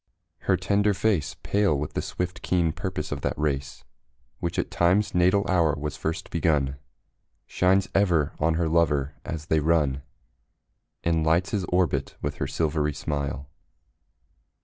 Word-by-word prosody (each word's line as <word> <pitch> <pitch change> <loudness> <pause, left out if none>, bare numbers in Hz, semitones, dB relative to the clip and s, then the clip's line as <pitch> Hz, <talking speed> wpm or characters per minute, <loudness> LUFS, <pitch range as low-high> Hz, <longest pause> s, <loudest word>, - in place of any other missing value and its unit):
Her - - +5
tender 100 0 +2
face, 100 -7 0
Pale 100 -7 +2
with 75 +1 -4
the - - -1
swift, 90 0 -4
keen 85 -4 +1
purpose 85 -2 -4
of 70 -1 -3
that - - -2
race 70 -2 -2 0.6
Which 85 - -3
at - - -1
Time's 90 +5 +2
natal 90 +3 +3
hour 85 -5 +3
was 75 0 -4
first 80 +3 -4
begun, 75 -5 +1 0.7
Shines 95 +1 +2
ever 85 -7 +2
on 80 +1 +2
her 85 0 +1
lover 75 -4 +2
as 80 -2 -5
they 80 -1 +2
run 75 -3 +1 1.0
And 80 -1 +1
lights 85 +4 +2
his 100 -4 -1
orbit 90 -1 0
with - - -3
her 70 - -2
silvery 75 +1 0
smile. 70 -2 -3
80 Hz, 150 wpm, -26 LUFS, 75-90 Hz, 1.0 s, Her